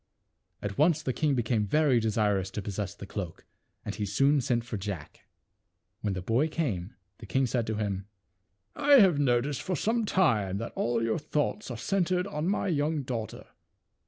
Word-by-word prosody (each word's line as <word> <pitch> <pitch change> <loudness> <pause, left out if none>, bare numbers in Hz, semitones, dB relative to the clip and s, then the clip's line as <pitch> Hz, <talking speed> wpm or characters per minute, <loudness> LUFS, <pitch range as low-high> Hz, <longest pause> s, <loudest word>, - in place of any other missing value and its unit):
At 100 -1 -4
once 155 0 +4
the 130 - -1
king 145 +2 +1
became 115 -3 0
very 145 0 +3
desirous 105 -4 +1
to 105 - -5
possess 100 0 -4
the 100 - -9
cloak, 95 -4 -6 0.4
and - - -3
he 105 - -3
soon 140 +8 +3
sent 120 -1 0
for 120 - -5
Jack. 95 -6 -6 0.7
When 105 -2 -1
the 95 - -4
boy 120 - +2
came 120 - -3 0.2
the 110 - -10
king 135 +6 +2
said 120 -2 -1
to 110 - -1
him, 100 -2 -2 0.4
" 95 +6 -48
I - - +9
have 190 - +7
noticed 135 +1 +1
for 185 - -2
some 225 +3 0
time 110 - +2
that 115 - -5
all 115 -1 0
your 115 +4 0
thoughts 150 +6 -2
are 120 - -5
centered 180 - 0
on 160 -5 -3
my 200 +1 0
young 150 -3 0
daughter. 115 -4 -5
120 Hz, 185 wpm, -29 LUFS, 105-150 Hz, 0.7 s, I